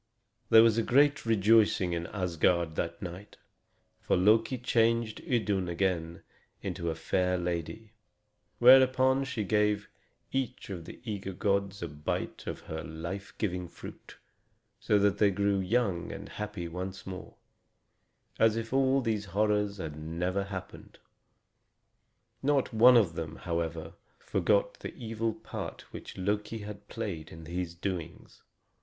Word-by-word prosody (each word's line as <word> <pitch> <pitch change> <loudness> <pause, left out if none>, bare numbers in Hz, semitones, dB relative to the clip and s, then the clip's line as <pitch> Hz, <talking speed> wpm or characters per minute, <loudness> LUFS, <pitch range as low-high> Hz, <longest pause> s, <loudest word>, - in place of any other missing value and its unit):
There 110 - +9
was 115 0 +4
great 140 +3 +3
rejoicing 105 -4 +4
in 85 0 -3
Asgard 85 -3 +1
that 85 +3 -3
night, 90 +3 -8 0.6
for - - +1
Loki 110 +6 +3
changed 115 -2 +1
Idun 100 -7 0
again 85 -2 -1 0.5
to 85 - -3
a 80 - -2
fair 90 +2 0
lady; 90 +5 -4 0.6
whereupon 130 +1 +6
she 125 -5 -3
gave 105 0 +1 0.4
each 130 -5 -3
of 85 -4 -6
the - - -10
eager 100 -4 -4
gods 100 -1 -1
a - - -2
bite 75 -1 -4
of - - -4
her 80 0 -6
life 85 +7 -6
giving 90 -4 -2
fruit, - - -11 0.6
so 105 - +2
that 100 0 +2
they 105 - +5
grew 100 0 +1
young 95 -2 0
and - - -8
happy 105 -4 -5
once 90 +3 -6
more, 95 -1 -8 1.0
as 110 -1 +4
if 115 +2 -4
all 135 0 +3
these 110 -4 -1
horrors 105 +1 +1
had 80 -5 -5
never 85 +5 -2
happened. 95 -2 -8 1.4
Not 140 -3 +1
one 120 +3 +8
of 100 -8 +3
them, 80 -1 -5
however, 85 -1 -3 0.2
forgot 100 -1 +1
the - - -7
evil 115 -1 -3
part - - -7
which - - -9
Loki 105 +4 -1
had 105 -1 -9
played 95 -10 -5
in 80 0 -10
these 85 +1 -4
doings. 85 -2 -6
100 Hz, 135 wpm, -30 LUFS, 85-115 Hz, 1.4 s, There